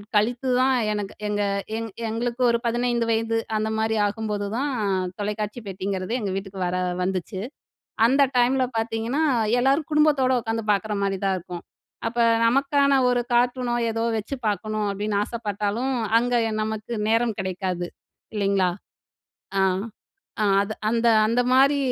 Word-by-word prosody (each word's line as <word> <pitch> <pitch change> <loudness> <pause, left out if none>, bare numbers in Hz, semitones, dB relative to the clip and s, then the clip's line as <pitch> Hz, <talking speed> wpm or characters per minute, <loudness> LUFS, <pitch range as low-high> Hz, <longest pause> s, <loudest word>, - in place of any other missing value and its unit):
கழித்துதான் 250 +4 +2 0.2
எனக்கு 205 -2 -3
எங்க 205 0 0 0.3
எங் 225 0 -3 0.2
எங்களுக்கு 235 +2 -3
ஒரு 235 - +3
15 240 0 +1
வயது 225 0 +1 0.2
அந்த 215 0 0
மாரி 220 0 0
ஆகும்போது 205 0 -2
தான், 285 +2 0 0.5
தொலைக்காட்சி 210 +2 -3
பெட்டிங்கிறது 190 +1 -3
எங்க 200 -4 -2
வீட்டுக்கு 195 0 -6
வர 180 - -1 0.3
வந்துச்சு. 185 0 -3 0.7
அந்த 275 +4 +4
டைம்ல 255 +2 +3
பார்த்தீங்கன்னா, 225 +6 -1 0.4
எல்லாரும் 275 +4 +2
குடும்பத்தோட 295 -4 +4
உட்காந்து 225 -1 -2
பார்க்குற 210 +1 -1
மாரிதான் 195 -1 0
இருக்கும். 175 0 -8 0.4
அப்ப 235 +1 -3 0.3
நமக்கான 280 +3 +3
ஒரு 245 0 +2
கார்ட்டூனோ, 245 0 +2 0.2
ஏதோ 225 0 -2 0.2
வச்சு 225 +6 -4
பார்க்கணும் 215 0 -2
அப்படின்னு 205 +1 -2
ஆசைப்பட்டாலும், 215 +3 -2 0.2
அங்க 245 +1 0 0.2
எ - - -4
நமக்கு 220 +1 -4 0.2
நேரம் 225 -1 +2
கிடைக்காது, 185 -1 -3 0.5
இல்லைங்களா? 195 -3 +2 0.9
அ. - - +4 0.8
அ - - +3 0.2
அது 200 +2 -3 0.2
அந்த 235 +1 +1 0.2
அந்த 235 +2 +2
மாரி 275 +2 +5
225 Hz, 130 wpm, -24 LUFS, 205-245 Hz, 0.9 s, மாரி